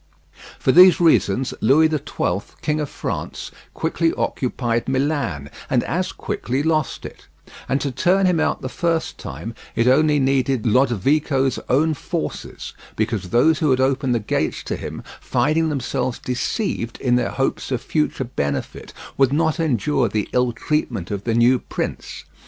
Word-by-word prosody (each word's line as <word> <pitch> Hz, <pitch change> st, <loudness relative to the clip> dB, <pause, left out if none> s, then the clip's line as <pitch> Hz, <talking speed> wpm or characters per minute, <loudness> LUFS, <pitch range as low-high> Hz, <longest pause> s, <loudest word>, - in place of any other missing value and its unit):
For -, -, +2 dB
these 180 Hz, +4 st, +8 dB
reasons 135 Hz, -, +3 dB
Louis 140 Hz, +8 st, +5 dB
the 155 Hz, -1 st, +1 dB
Twelfth, 100 Hz, -8 st, -3 dB
King 155 Hz, 0 st, 0 dB
of 145 Hz, -, -3 dB
France, -, -, -5 dB, 0.2 s
quickly 165 Hz, 0 st, 0 dB
occupied 120 Hz, -2 st, -1 dB
Milan, 130 Hz, -, -1 dB, 0.2 s
and -, -, +2 dB
as -, -, -2 dB
quickly 130 Hz, +4 st, -3 dB
lost 155 Hz, -3 st, 0 dB
it; -, -, -11 dB, 0.4 s
and 135 Hz, -, +2 dB
to 140 Hz, -, -1 dB
turn 185 Hz, +9 st, +2 dB
him 180 Hz, -3 st, +2 dB
out -, -, 0 dB
the -, -, -2 dB
first 165 Hz, +4 st, -1 dB
time 80 Hz, +12 st, -7 dB, 0.2 s
it 115 Hz, -, +2 dB
only 150 Hz, +3 st, +4 dB
needed 135 Hz, -3 st, +1 dB
Lodovico's 130 Hz, +3 st, +2 dB
own 155 Hz, +5 st, +3 dB
forces; 145 Hz, -, -5 dB, 0.2 s
because 110 Hz, -4 st, -2 dB
those 145 Hz, -, +3 dB
who 155 Hz, -, +2 dB
had 130 Hz, -1 st, +3 dB
opened 130 Hz, -1 st, +1 dB
the -, -, +1 dB
gates 105 Hz, -, -2 dB
to -, -, -3 dB
him, -, -, -7 dB, 0.2 s
finding 160 Hz, +2 st, +1 dB
themselves 130 Hz, -3 st, -2 dB
deceived 125 Hz, -, -3 dB
in 125 Hz, -1 st, +2 dB
their 125 Hz, -, +1 dB
hopes 135 Hz, -, -2 dB
of 130 Hz, -3 st, -1 dB
future 150 Hz, -3 st, -1 dB
benefit, 70 Hz, -, -4 dB, 0.2 s
would 135 Hz, -1 st, +4 dB
not 160 Hz, +2 st, +1 dB
endure 135 Hz, -4 st, +1 dB
the 105 Hz, 0 st, -1 dB
ill 125 Hz, -1 st, +2 dB
treatment 120 Hz, -, -2 dB
of 100 Hz, -1 st, -4 dB
the 115 Hz, -1 st, 0 dB
new 120 Hz, +2 st, +4 dB
prince. -, -, -5 dB
135 Hz, 160 wpm, -21 LUFS, 120-155 Hz, 0.4 s, these